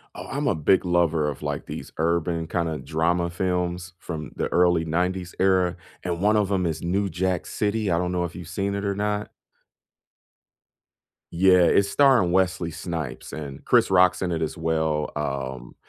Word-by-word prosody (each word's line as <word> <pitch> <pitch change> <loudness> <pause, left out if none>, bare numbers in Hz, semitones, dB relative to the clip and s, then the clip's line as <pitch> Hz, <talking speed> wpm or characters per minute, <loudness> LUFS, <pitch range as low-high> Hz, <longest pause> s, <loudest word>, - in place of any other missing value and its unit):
Oh, - - -8
I'm 145 +1 -2
a 95 - +1
big 80 +6 +3
lover 85 -4 +2
of, 70 - -7
like, - - -4
these - - -7
urban 85 0 0
kinda 80 -2 -1
drama 85 +2 0
films 90 -1 -2
from 80 -4 -6
the - - -1
early 90 -2 +3
90s 90 +2 -1
era, 95 -2 +2 0.3
and 85 -2 -2
1 105 +1 +3
of 105 -2 +2
them 95 -3 +1
is 80 -1 -2
New 100 +3 0
Jack 90 0 -1
City. 105 -1 -1
I 85 - +2
don't 90 +1 -1
know 90 -1 0
if 85 - -7
you've 90 -2 -8
seen 100 +3 -2
it 100 - -3
or 100 -1 0
not. 105 0 -2 2.0
Yeah, 90 +1 +5
it's 100 +3 +4
starring 125 -9 +4
Wesley 90 -3 +1
Snipes, 85 -2 -5
and 70 -2 -7
Chris - - +3
Rock's 90 -1 +4
in 90 -2 -1
it 80 - -2
as 80 +2 -3
well. 80 -2 0
Um, 65 -4 -4
90 Hz, 180 wpm, -24 LUFS, 80-95 Hz, 2.0 s, Yeah